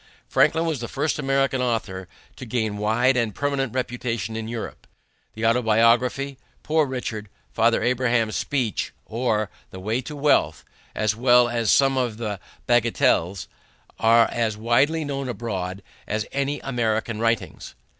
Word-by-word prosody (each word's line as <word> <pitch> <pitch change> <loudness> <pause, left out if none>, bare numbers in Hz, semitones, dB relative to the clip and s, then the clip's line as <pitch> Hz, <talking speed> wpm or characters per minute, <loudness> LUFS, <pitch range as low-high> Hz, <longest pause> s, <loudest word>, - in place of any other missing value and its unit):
Franklin 165 +1 +3
was 160 -5 -1
the 120 - -4
first 145 +4 -1
American 135 -2 +1
author 110 -7 -2 0.3
to - - -9
gain 110 -3 -1
a - - -6
wide 120 +5 +3
and 115 -4 0
permanent 140 -3 -1
reputation 120 -3 -3
in 110 0 -4
Europe. 115 -1 -6 0.5
The 110 +1 -2
Autobiography, 120 +4 +2 0.2
Poor 155 -1 +2
Richard, 115 -5 -5 0.2
Father 115 +1 +2
Abraham's 120 -3 +1
Speech 125 -8 -1
or 110 -3 -1 0.2
The 95 - -9
Way 110 +6 -1
to 150 +4 -8
Wealth, 140 - +2 0.3
as 110 -1 +1
well 120 0 +5
as 115 -3 0
some 135 -1 +4
of 120 -4 -1
the 105 -4 -4 0.3
Bagatelles, 110 -6 +2 0.5
are 115 +1 +5
as 110 -3 -1
widely 135 +8 +2
known 140 -2 -3
abroad 100 -4 -4 0.2
as 105 0 -1
any 140 +1 -1
American 115 -3 -1
writings. 115 0 -2
120 Hz, 145 wpm, -24 LUFS, 110-130 Hz, 0.5 s, well